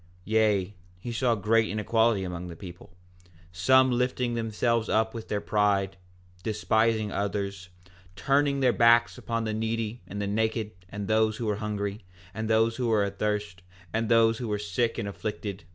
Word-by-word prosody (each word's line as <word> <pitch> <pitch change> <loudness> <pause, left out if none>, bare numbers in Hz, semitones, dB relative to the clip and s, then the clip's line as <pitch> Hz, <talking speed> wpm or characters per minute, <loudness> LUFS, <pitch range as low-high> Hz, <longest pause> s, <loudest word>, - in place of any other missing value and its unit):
4:12 90 - -29 0.2
Yea, 105 -2 +1 0.2
he 120 +7 -6
saw 120 0 +1
great 110 +2 +2
inequality 110 0 +1
among 90 -1 -5
the 85 - -8
people, 90 0 -11 0.6
some 130 +9 +4
lifting 125 0 0
themselves 115 0 0
up 110 0 +1
with 115 -2 -7
their 105 - -1
pride, 100 -2 +1 0.5
despising 110 +1 +1
others, 100 -2 -3 0.5
turning 140 +3 +1
their 125 -2 +4
backs 115 0 +4
upon 115 -1 -2
the 110 -1 -2
needy 110 +1 -2
and 100 +3 -6
the 100 - -1
naked 110 +1 -1 0.2
and 100 0 -5
those 110 0 +2
who 120 - -4
were 105 -2 0
hungry, 105 0 -3 0.3
and 110 0 -4
those 115 +1 +2
who 125 -2 -1
were 110 -3 +3
athirst, 100 -1 -3 0.3
and 110 0 -1
those 115 -1 +4
who 120 - -4
were 105 -1 -1
sick 105 +3 -1
and 100 - -3
afflicted. 100 -2 -5
110 Hz, 170 wpm, -27 LUFS, 100-115 Hz, 0.6 s, some